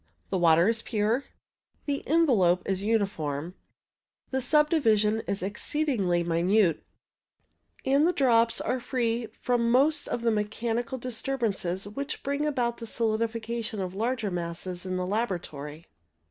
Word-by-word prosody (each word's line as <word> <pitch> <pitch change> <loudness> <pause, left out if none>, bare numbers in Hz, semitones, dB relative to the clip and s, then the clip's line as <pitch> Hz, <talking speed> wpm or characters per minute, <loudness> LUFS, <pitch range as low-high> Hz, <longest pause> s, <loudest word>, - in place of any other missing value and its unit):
The - - +1
water 170 +1 +5
is 230 0 +2
pure, 220 +4 0 0.6
the 280 -1 -2
envelope 225 - +3
is 195 -1 -1
uniform, 180 -8 -1 0.8
the 265 0 0
subdivision 245 - +3
is 200 -2 -2
exceedingly 205 - 0
minute, 170 +1 +2 1.0
and 280 +4 +4
the - - +3
drops 230 -6 +3
are 255 - -1
free 235 -2 -1
from 240 -2 +1
most 285 +5 +3
of 235 - -3
the 230 - +3
mechanical 230 +4 -2
disturbances 230 -7 -2
which 280 +8 -5
bring 280 +2 -1
about 245 -5 0
the 230 - -7
solidification 230 0 -2
of 185 -1 -3
larger 225 0 -1
masses 175 +1 -4
in 185 0 -2
the 180 - -1
laboratory. 170 -7 -3
225 Hz, 130 wpm, -27 LUFS, 185-250 Hz, 1.0 s, water